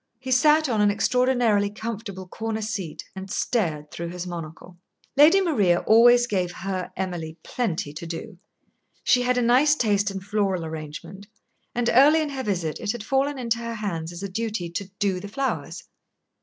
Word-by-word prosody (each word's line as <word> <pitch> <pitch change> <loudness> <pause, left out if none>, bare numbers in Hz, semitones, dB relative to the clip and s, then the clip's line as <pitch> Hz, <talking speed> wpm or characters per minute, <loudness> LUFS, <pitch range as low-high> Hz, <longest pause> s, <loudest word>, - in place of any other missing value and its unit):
He 260 +2 -6
sat 300 +4 +5
on 225 -5 +1
an 205 - +5
extraordinarily 235 -1 +2
comfortable 210 -3 -6
corner 220 +3 -4
seat, 200 -7 -4
and 190 0 -7
stared 160 -10 -1
through 170 - -5
his 180 +1 -6
monocle. 175 0 -8 0.4
Lady 300 +7 +7
Maria 205 - +2
always 240 +2 +6
gave 185 -6 -1
her 185 0 -4
Emily 175 -4 -4
plenty 175 -11 -2
to 165 +2 -7
do. 175 +3 -7 0.6
She 250 - +4
had 250 0 +1
a 245 - +2
nice 265 +6 +4
taste 210 -5 +1
in 195 -1 -5
floral 195 -3 -1
arrangement, 160 +5 -8 0.5
and 240 0 0
early 290 +6 +6
in 310 -2 -1
her 270 -2 -4
visit 180 -9 -2
it 215 -2 -2
had 240 -3 -6
fallen 270 +4 0
into 235 -2 -1
her 230 0 -4
hands 170 -7 -4
as 175 +3 -8
a - - -2
duty 200 -3 -3
to 195 +4 -3
"do" 195 -3 0
the 200 - -7
flowers. 260 +6 -3
205 Hz, 175 wpm, -24 LUFS, 180-245 Hz, 0.6 s, Lady